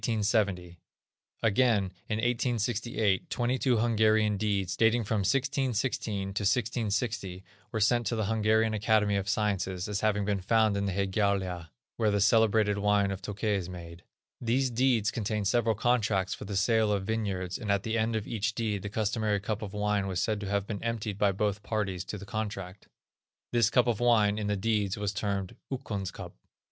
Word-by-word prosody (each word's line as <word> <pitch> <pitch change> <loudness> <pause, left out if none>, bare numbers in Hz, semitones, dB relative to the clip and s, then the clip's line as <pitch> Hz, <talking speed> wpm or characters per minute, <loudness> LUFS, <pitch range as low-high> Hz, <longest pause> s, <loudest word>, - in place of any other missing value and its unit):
Again, 110 -3 +3 0.2
in 105 - 0
1868, 115 -3 0
twenty 125 +2 0
two 125 -3 +2
Hungarian 110 -2 +3
deeds, 100 -3 -1
dating 115 +1 +3
from 110 0 -1
1616 125 -3 -1
1660, 105 -2 -1 0.3
were 110 - -2
sent 120 +2 +2
to 115 - 0
the 110 -2 -1
Hungarian 110 +1 +2
Academy 105 -1 +2
of 100 0 -1
Sciences, 95 -3 -1
as 105 -2 -2
having 105 -2 +1
been 100 -2 -1
found 110 +1 +2
in 100 0 -1
the - - 0
Hegyalja, 95 -3 -1 0.3
where 110 -2 +2
the 100 0 +1
celebrated 105 0 +3
wine 100 -1 +2
of 95 - -5
Tokay 105 +1 -2
is 90 -2 -5
made. 85 -1 -9 0.4
These 125 +2 +1
deeds 120 -4 +2
contained 105 -1 -2
several 115 +1 +2
contracts 105 -4 +1
for - - -7
the 100 - -5
sale 110 +2 +2
of 100 -2 -1
vineyards, 95 -5 -2
and 105 -4 -2
at 100 -1 +1
the 110 0 -2
end 115 0 0
of 110 -2 -2
each 110 0 -2
deed 105 -4 -1
the 105 - -5
customary 105 0 0
cup 105 +2 -3
of 105 -3 -5
wine 105 -1 0
was 95 -2 -2
said 110 +2 0
to 100 -2 -5
have 100 -1 0
been 100 -1 -5
emptied 110 -3 -3
by 105 -1 +4
both 100 +1 -1
parties 100 -5 -2
to 105 - -5
the 100 - -9
contract. 100 -2 -5 0.6
This 115 -2 +3
cup 125 +1 +3
of 120 -4 0
wine, 110 -4 +3
in 105 - -2
the 105 0 0
deeds, 100 -1 0
was 105 -1 -2
termed, 100 -2 -3 0.2
"Ukkon's 105 -8 -3
cup." - - -9
105 Hz, 175 wpm, -29 LUFS, 100-115 Hz, 0.6 s, by